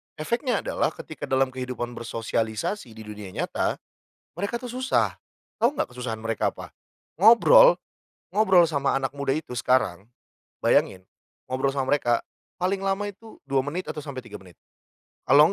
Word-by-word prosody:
efeknya 235 - -1
adalah - - -1
ketika 155 - -8
dalam 130 0 +2
kehidupan 125 -1 -4
bersosialisasi 115 - -3
di 110 - -9
dunia 105 -3 -9
nyata, - - -1 0.6
mereka 200 +6 -2
tuh 250 - -7
susah, 255 +2 0 0.4
tahu 245 +6 +1
enggak 125 - -2
kesusahan 120 -3 -4
mereka 115 0 -1
apa? - - -11 0.4
Ngobrol, 235 - +7 0.5
ngobrol 190 -5 +5
sama 140 -4 0
anak 135 0 -2
muda 140 0 -1
itu 155 -5 -7
sekarang, 115 -5 +1 0.5
bayangin 95 -1 +2 0.4
ngobrol 130 +2 0
sama 135 -1 -1
mereka 120 -5 +1 0.3
paling 185 +2 0
lama 195 +1 0
itu 210 +2 -10
2 135 -1 +1
menit 160 +7 -4
atau - - -7
sampai 140 -4 -7
3 - - -10
menit 90 -3 -16 0.7
kalau 150 +7 +7
140 Hz, 145 wpm, -25 LUFS, 120-195 Hz, 0.7 s, Ngobrol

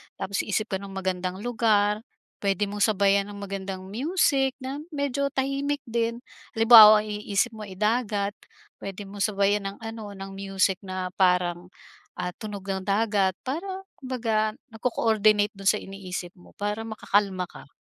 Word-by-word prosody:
tapos 200 0 -3
isip 215 +2 -1
ka 190 - -1
ng 195 0 -9
magandang 185 0 -3
lugar, 215 -3 +2 0.4
puwede 200 0 0
mong 205 +1 +2
sabayan 200 -1 +3
ng - - -9
magandang 195 -1 -5
music 270 - +1
na 270 +2 -4
medyo 280 -3 -1
tahimik 275 +1 -1
din. 235 0 -2 0.3
Halimbawa 220 -2 +9
i-isip 210 +2 -1
mo, 215 -1 -8
eh, 190 - -9
dagat, 210 -1 0 0.5
puwede 195 +1 -6
mong 200 +1 -10
sabayan 200 0 +1
ng - - -20
ano, 220 -2 -7
ng 195 0 -8
music 195 -1 0
na 185 -1 -4
parang, 180 -1 +2 0.5
ah, 180 - -3
tunog 210 -3 -6
ng 190 -1 -3
dagat, 200 -2 +2
parang 375 +8 -4 0.2
kumbaga 225 -5 -1 0.2
nagco-coordinate 215 -2 +2
dun 195 - -10
sa 210 +1 +4
iniisip 185 -2 -6
mo 180 - -18
para 210 +2 -3
makakalma 200 -4 0
ka. - - -13
205 Hz, 150 wpm, -26 LUFS, 195-230 Hz, 0.5 s, Halimbawa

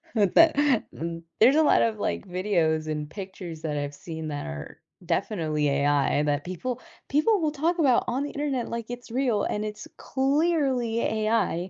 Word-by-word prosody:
But 205 -4 +2
th 325 -1 +8
uh, 290 -5 +4 0.6
there's 250 +6 +6
a - - +6
lot 295 - +4
of, 220 -2 -1
like, - - -2
videos 170 -4 0
and 150 -1 -3
pictures 185 -4 -8
that 150 -2 -2
I've 145 0 -3
seen 160 +1 -7
that 145 -1 -4
are 70 0 -8 0.3
definitely 155 -7 0
AI 145 +1 +2
that 145 -1 0
people 235 +8 -4 0.3
people 390 +10 +3
will 310 -3 0
talk 320 +4 0
about 265 -6 +4
on 255 +3 -1
the 290 - -4
internet 275 -5 -2
like 230 -1 -5
it's 245 -1 -8
real 240 -4 +1
and 210 - -1
it's 210 0 -6
clearly 270 -4 +1
AI. 215 -5 0
215 Hz, 175 wpm, -26 LUFS, 160-265 Hz, 0.6 s, th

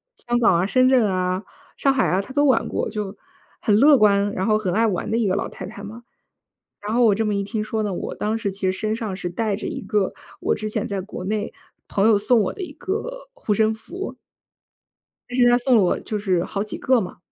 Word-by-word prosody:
香 240 0 -1
港 225 -7 +4
啊、 185 - +1
深 255 +5 +3
圳 255 -4 +4
啊、 185 +1 -1 0.3
上 275 - +2
海 265 - +2
啊， 185 +2 +1
她 200 - -11
都 290 0 +3
玩 265 - +3
过， - - -2
就 210 -2 -5 0.4
很 210 -3 +3
乐 280 +4 +7
观， 205 -1 +3
然 190 -1 -2
后 215 - +4
很 190 -5 -2
爱 225 +2 +3
玩 195 +1 -2
的 225 - +1
一 230 -3 +1
个 185 - +1
老 - - -2
太 - - -8
太 205 - -10
嘛。 220 +4 -9 0.8
然 210 +1 -3
后 245 +1 +4
我 215 - +5
这 220 +2 0
么 210 -1 0
一 200 - 0
听 210 +2 -3
说 215 0 -2
呢， 205 - -2
我 - - -4
当 215 +2 -1
时 210 -3 -2
其 195 - -10
实 185 -1 +2
身 215 +3 -2
上 220 -4 -4
是 180 -2 -4
带 205 +3 -1
着 - - -5
一 - - -4
个 210 -3 0 0.3
我 - - +1
之 215 0 -4
前 215 -1 -2
在 200 -1 -3
国 185 -1 -7
内 210 +2 -2 0.4
朋 200 +2 +2
友 220 -2 +5
送 225 +4 +3
我 195 - -1
的 405 - -8
一 355 - -5
个 - - -5
护 365 - -1
身 220 +1 +2
符。 360 - -7 1.1
但 245 - -4
是 245 - +5
他 240 - +5
送 250 +1 +2
了 210 - +5
我 180 - +1
就 215 - -4
是 185 -4 +1
好 200 - -3
几 215 - -6
个 255 -2 +2
嘛， 185 - -7
215 Hz, 270 characters per minute, -22 LUFS, 200-240 Hz, 1.1 s, 乐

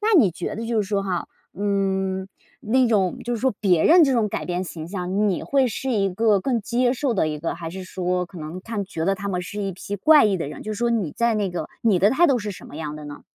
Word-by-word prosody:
那 430 -1 +3
你 205 -10 +5
觉 170 - -5
得 225 - -5
就 230 -2 +1
是 195 - -4
说 200 -2 0
哈， 185 -3 -2 0.3
嗯， 190 -1 -1 0.3
那 250 +2 +2
种 195 -5 +1
就 240 0 -1
是 225 - -4
说 260 0 +2
别 180 -6 +3
人 340 +2 +7
这 270 - +2
种 225 -4 +2
改 - - -4
变 180 +1 -2
形 160 -2 -7
象， 190 +2 -1
你 185 - -1
会 270 -2 +2
是 260 +4 -3
一 200 -5 +2
个 210 +1 +2
更 240 +2 0
接 245 +3 +1
受 265 -1 -1
的 170 -6 +1
一 150 -1 -4
个， 165 +3 -3
还 165 -1 -6
是 185 +1 -7
说 180 -1 -1
可 175 0 -11
能 160 +4 -6
看 210 -1 -4
觉 165 -4 -4
得 195 - +2
他 200 +1 -5
们 180 -2 -1
是 205 +3 -6
一 195 -1 -2
批 200 +3 -6
怪 300 +6 +6
异 200 -3 +2
的 165 - -3
人， - - -8
就 215 - -4
是 205 - -6
说 240 0 +1
你 205 -10 0
在 235 -1 +2
那 205 -3 0
个 175 - -4
你 210 -6 +3
的 200 +4 +4
态 340 +7 +4
度 270 -5 +3
是 210 -2 -4
什 190 - -10
么 145 - -10
样 155 -1 -5
的 150 - -9
呢？ 145 0 -9
200 Hz, 300 characters per minute, -23 LUFS, 180-230 Hz, 0.3 s, 人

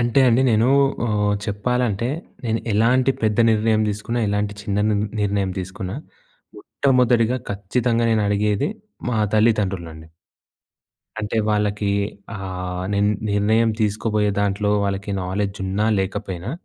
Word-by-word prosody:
అంటే 120 +3 +2
అండి 120 +3 +4
నేను 110 +2 +3 0.4
ఆహ్, 105 -1 +1
చెప్పాలంటే 115 +2 -1 0.4
నేను 115 0 0
ఎలాంటి 125 +5 +3
పెద్ద 110 -1 +1
నిర్ణయం 110 0 +2
తీసుకున్నా, 110 +4 -3
ఎలాంటి 105 0 -1
చిన్న 100 0 -1
నిర్ 105 -1 +1 0.2
నిర్ణయం 100 -2 0
తీసుకున్నా. 95 +3 -6 0.6
మొట్టమొదటిగా 125 -2 +2
ఖచ్చితంగా 115 +4 0
నేను 110 -1 +2
అడిగేది 105 0 +1 0.4
మా 115 - 0 0.2
తల్లిదండ్రుల్నండి. 95 -8 0 1.1
అంటే 110 +1 -3
వాళ్ళకి 105 -1 0 0.4
ఆహ్, 90 -2 -5
నేను 100 0 +2 0.2
నిర్ణయం 110 +3 +2
తీసుకోబోయే 105 0 +1
దాంట్లో 100 +1 0
వాళ్ళకి 100 +1 -3
నాలెడ్జ్ 100 +2 -2
ఉన్నా, 100 +3 -1
లేకపోయినా. 95 +1 -3
105 Hz, 115 wpm, -21 LUFS, 100-115 Hz, 1.1 s, అండి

